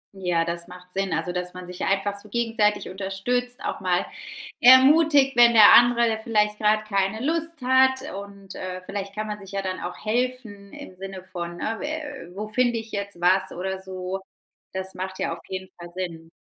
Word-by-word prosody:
Ja, 175 -3 0
das 170 0 -4
macht 180 0 -13
Sinn, 195 0 -1
also, 180 - -1
dass 180 0 -5
man 180 0 -8
sich 180 0 -7
einfach 200 +1 0
so 210 - -14
gegenseitig 225 -2 0
unterstützt, 200 +7 -2
auch - - -3
mal 180 -1 0 0.6
ermutigt, 270 +1 +6
wenn 240 -1 +7
der 215 -2 +9
andere 235 -2 +5
vielleicht 210 -3 +1
grade 215 0 +2
keine 200 +4 0
Lust 330 0 -1
hat 265 +2 +3
und, 200 0 -9
äh, 185 0 -6
vielleicht 195 0 -6
kann 215 0 -3
man 210 -1 -5
sich 195 -1 -12
ja 195 0 -2
dann 185 -1 -3
auch 180 0 -6
helfen 225 -4 -2
im 185 - -11
Sinne 190 -1 -8
von, 175 -1 -5
äh, 225 0 -3
wä 290 - -6
wo 210 +1 -4
finde 240 +1 +1
ich 225 0 -7
jetzt 200 -3 -5
was 185 +2 +3
oder 190 +2 -4
so. 190 0 -5 0.5
Das 190 0 -4
macht 190 +1 -6
ja - - -2
auf 170 - -9
jeden 190 0 -5
Fall 175 0 -9
Sinn. 165 -3 -6
200 Hz, 190 wpm, -24 LUFS, 185-235 Hz, 0.6 s, der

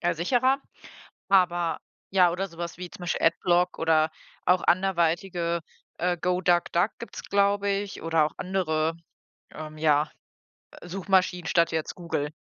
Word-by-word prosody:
äh, 175 -1 +1
sicherer. 255 - +2 0.7
Aber, 175 -3 +2 0.3
ja 180 -3 +5
oder 190 +3 -2
sowas 170 0 -7
wie 180 -1 -7
zum - - -12
Beispiel 175 - 0
Adblock 175 +2 +2
oder 160 -1 +3 0.3
auch 180 0 +4
anderweitige, 175 -1 +1 0.4
äh, 180 0 0
GoDuckDuck 180 +1 +1
gibt 235 - -9
es, - - -7
glaube 200 0 +1
ich, 200 -2 -3
oder 165 -2 +3
auch - - -12
andere, 165 -4 0 0.6
ähm, 155 0 -8
ja, 150 -1 +2 0.8
Suchmaschinen 180 -1 0
statt 170 -4 +3
jetzt 160 -1 -3
Google. 155 -4 -3
175 Hz, 135 wpm, -26 LUFS, 165-190 Hz, 0.8 s, ja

